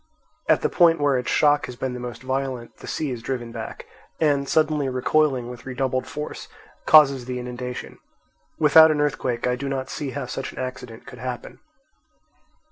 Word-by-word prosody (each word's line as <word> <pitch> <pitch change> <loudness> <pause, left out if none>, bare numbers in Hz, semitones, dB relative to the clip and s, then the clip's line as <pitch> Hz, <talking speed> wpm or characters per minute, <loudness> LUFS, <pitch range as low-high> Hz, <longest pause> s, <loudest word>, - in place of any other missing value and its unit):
At - - +4
the - - +4
point 165 -2 +4
where 145 -2 +2
its 125 - -4
shock 145 -1 +3
has 125 - -8
been 130 +1 -3
the 125 - -6
most 125 +1 -7
violent, 130 -2 -3
the - - -11
sea 150 -4 -2
is 120 -2 -5
driven 120 -2 -4
back - - -7 0.3
and, 140 -3 +1
suddenly 150 -3 +2
recoiling 130 0 +1
with 125 +1 -10
redoubled 130 0 -2
force, 150 +1 -6 0.4
causes 140 -5 +6
the 125 0 -4
inundation. 125 0 -6 0.6
Without 160 +1 +7
an 155 -1 +1
earthquake 130 -5 -1
I 125 0 +1
do 135 +2 -4
not 135 -1 -3
see 145 -3 -4
how 140 0 -4
such 135 +2 -5
an - - -17
accident 125 -3 -6
could 125 - -11
happen. 125 0 -6
130 Hz, 180 wpm, -23 LUFS, 125-145 Hz, 0.6 s, Without